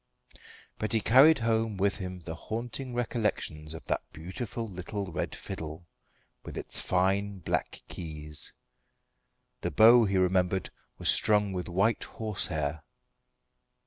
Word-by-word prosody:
But 110 - -1
he 115 - +4
carried 135 +9 +7
home 115 -2 0
with 100 +2 +1
him 90 -3 -6
the 80 0 -6
haunting 120 +7 -5
recollections 105 -10 -2
of 80 - -10
that - - 0
beautiful 105 +8 -5
little 95 0 -5
red - - -3
fiddle, 80 +2 -7 0.6
with - - -8
its - - -3
fine 95 +2 +1
black 90 - -2
keys. 75 -3 -3 1.1
The - - -1
bow, 115 +1 +7
he 100 -1 +1
remembered, 95 0 +1 0.3
was - - +3
strung 105 -2 +3
with 90 -1 -3
white 100 +6 +2
horsehair. 85 -9 -2
95 Hz, 125 wpm, -29 LUFS, 90-110 Hz, 1.1 s, carried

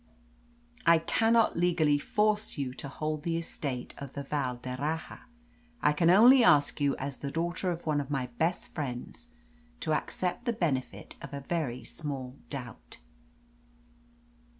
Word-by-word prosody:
I 170 -1 +6
cannot 225 +7 +3
legally 165 -4 +3
force 210 +5 0
you 135 -3 -2
to 140 - -7
hold 155 +2 -3
the 165 +1 -1
estate 140 -6 -4
of 140 -1 -8
the 140 - -5
Val 135 -3 -1
d'Erraha. 130 +6 -4 0.6
I 150 - +3
can 165 +3 +3
only 240 +7 +8
ask 145 -7 +4
you 140 -1 +2
as 135 0 -4
the 140 - -4
daughter 175 +4 -1
of 170 -1 -4
one 150 -2 +1
of 140 - -8
my 135 -3 -1
best 170 +2 0
friends 140 - -5 0.5
to 155 -7 0
accept 180 +8 -2
the 235 - +1
benefit 150 - -2
of - - -7
a 140 - -5
very 135 -5 -2
small 135 -2 -5
doubt." 125 -5 -8
150 Hz, 150 wpm, -30 LUFS, 140-175 Hz, 0.6 s, only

